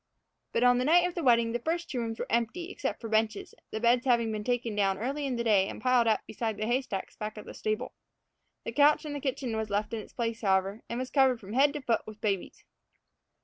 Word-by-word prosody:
But 230 - +1
on 245 0 +5
the - - +1
night 345 +5 +5
of 355 - -6
the 345 - -3
wedding 235 -4 +4
the 240 - -1
first 335 +6 -2
two 255 - -3
rooms 225 -1 -3
were - - -3
empty, 285 - -1
except - - -3
for 230 - -6
benches, 220 -1 0 0.2
the 220 - -4
beds 240 +2 +3
having 235 -3 +2
been 215 -1 -3
taken 240 -2 -1
down 195 -2 +2
early 275 +6 -2
in 255 - -1
the 235 - -1
day 205 -4 +4
and - - -7
piled 245 0 +3
up 220 - +3
beside 220 -1 -3
the 215 - -2
hay 245 +4 +2
stacks 200 -7 -6
back 215 0 -6
of 210 - -8
the - - -9
stable. 215 0 -3 0.7
The - - -3
couch 295 +2 +4
in 295 - -4
the 290 - -3
kitchen 260 -4 -2
was 220 -1 -2
left 205 +2 -1
in 225 - -2
its 210 - -11
place, 230 -1 -3
however, 195 +1 +1
and 235 - -3
was 255 0 -4
covered 265 -4 +4
from 205 0 -9
head 280 +3 +4
to 295 -2 -5
foot 235 -3 +1
with 215 -1 -10
babies. 200 -4 -3
235 Hz, 255 wpm, -29 LUFS, 215-260 Hz, 0.7 s, on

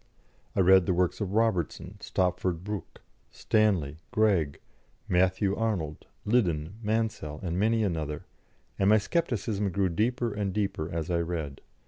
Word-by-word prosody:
I 95 - +3
read 95 0 +6
the 90 - +2
works 90 +3 +1
of 100 -2 -2
Robertson, 110 -8 0
Stopford 90 -1 -1
Brooke, 105 0 -6 0.3
Stanley, 95 -10 +1
Greg, 100 - +2 0.5
Matthew 95 +2 +2
Arnold, 90 -10 -2 0.2
Liddon, 90 -8 +1
Mansel, 110 -9 -1
and 90 0 -2
many 110 +2 +2
another, 80 -6 -2 0.5
and 95 - +4
my 110 - +7
scepticism 110 - -1
grew 95 +1 +1
deeper 115 +5 0
and 100 -2 -2
deeper 95 -6 -1
as 80 +1 -3
I 85 - +2
read. 80 -5 -3
95 Hz, 135 wpm, -28 LUFS, 85-110 Hz, 0.5 s, my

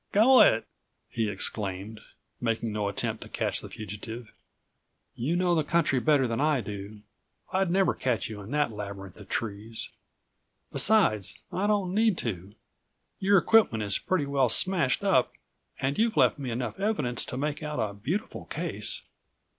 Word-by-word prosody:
"Go 245 +6 +7
it," 115 - +5 0.4
he 115 -3 -1
exclaimed, 100 +1 -3 0.4
making 115 -1 -1
no 105 -1 -1
attempt 100 - -2
to73 - - -14
catch - - 0
the - - -9
fugitive, 110 +3 -8 0.8
"you 145 +9 -1
know 180 0 +2
the 160 -2 +2
country 155 -4 +2
better 145 0 +3
than 115 +3 -2
I 150 -2 +3
do. 105 -1 -7 0.5
I'd 190 -1 +2
never 190 +1 +3
catch 125 -4 -1
you 105 -2 -7
in 100 - -10
that 145 -2 +1
labyrinth 100 -3 -7
of 105 -2 -13
trees. 110 0 -4 0.8
Besides, 190 - +2 0.2
I 195 +3 0
don't 200 -4 +1
need 215 -2 +3
to. 100 -2 -5 0.6
Your 195 +1 +4
equipment 175 - +4
is 100 -1 +2
pretty 185 -6 0
well 140 -3 +2
smashed 170 - +2
up - - +3 0.5
and 135 +6 -1
you've 225 -5 +2
left 125 -2 +4
me 135 -3 -4
enough 115 -2 -4
evidence 175 - 0
to 125 - -5
make 150 +3 -2
out 150 -1 -4
a 105 -1 -1
beautiful 150 - -4
case." - - -3
125 Hz, 160 wpm, -28 LUFS, 105-175 Hz, 0.8 s, Go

